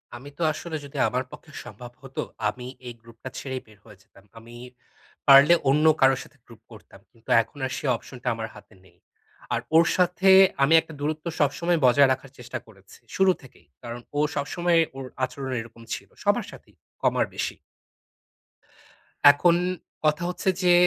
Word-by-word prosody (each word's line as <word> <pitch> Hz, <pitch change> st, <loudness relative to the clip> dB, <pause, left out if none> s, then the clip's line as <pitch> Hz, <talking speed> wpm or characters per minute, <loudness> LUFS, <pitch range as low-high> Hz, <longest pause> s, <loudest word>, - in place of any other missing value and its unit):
আমি 135 Hz, +4 st, -10 dB
তো -, -, -9 dB
আসলে 165 Hz, 0 st, -6 dB
যদি 140 Hz, +1 st, -10 dB
আমার 125 Hz, +1 st, -1 dB
পক্ষে 150 Hz, -, -13 dB
সম্ভব 120 Hz, -1 st, -10 dB
হতো 135 Hz, 0 st, -6 dB, 0.3 s
আমি 125 Hz, +3 st, -8 dB, 0.2 s
এই 120 Hz, -, -6 dB
গ্রূপটা 115 Hz, +2 st, -11 dB
ছেড়েই 130 Hz, -2 st, -5 dB
বের 110 Hz, -2 st, -19 dB
হয়ে 105 Hz, -, -15 dB
যেতাম। 100 Hz, -, -22 dB
আমি 120 Hz, +1 st, -14 dB, 0.7 s
পারলে 140 Hz, +4 st, +8 dB, 0.2 s
অন্য 150 Hz, +3 st, +3 dB, 0.2 s
কারোর 135 Hz, 0 st, +5 dB
সাথে 145 Hz, -, -20 dB
গ্রূপ 115 Hz, -1 st, -17 dB
করতাম। 105 Hz, -3 st, -15 dB
কিন্তু 115 Hz, -1 st, -21 dB
এখন 115 Hz, +6 st, -13 dB
আর 130 Hz, -, -4 dB
সে -, -, -6 dB
অপশনটা 125 Hz, +1 st, -11 dB
আমার 115 Hz, 0 st, -5 dB
হাতে -, -, -16 dB
নেই। -, -, -24 dB, 0.6 s
আর -, -, +1 dB, 0.2 s
ওর 165 Hz, 0 st, +7 dB
সাথে 180 Hz, +1 st, +2 dB, 0.3 s
আমি 150 Hz, +4 st, +4 dB
একটা 160 Hz, -, -13 dB
দূরত্ব 155 Hz, +2 st, -3 dB
সবসময় 165 Hz, +4 st, +1 dB
বজায় 135 Hz, +2 st, +5 dB
রাখার 130 Hz, 0 st, -10 dB
চেষ্টা 120 Hz, 0 st, -6 dB
করেছি, 95 Hz, -3 st, -18 dB, 0.2 s
শুরু 190 Hz, -1 st, +4 dB
থেকেই। 100 Hz, -, -18 dB, 0.2 s
কারণ 120 Hz, +1 st, -6 dB, 0.2 s
ও -, -, +2 dB, 0.2 s
সবসময়ে 170 Hz, +4 st, +1 dB, 0.2 s
ওর 135 Hz, -, -6 dB, 0.2 s
আচরণ 130 Hz, +1 st, -4 dB
এরকম 115 Hz, 0 st, -14 dB
ছিল -, -, -7 dB
সবার -, -, +1 dB
সাথেই, -, -, -16 dB, 0.3 s
কম -, -, +2 dB
আর -, -, +1 dB
বেশি। -, -, -3 dB, 1.8 s
এখন 170 Hz, +4 st, +3 dB, 0.5 s
কথা 155 Hz, +3 st, +2 dB
হচ্ছে 185 Hz, +1 st, -1 dB
যে, 180 Hz, -1 st, +5 dB
135 Hz, 170 wpm, -25 LUFS, 120-155 Hz, 1.8 s, পারলে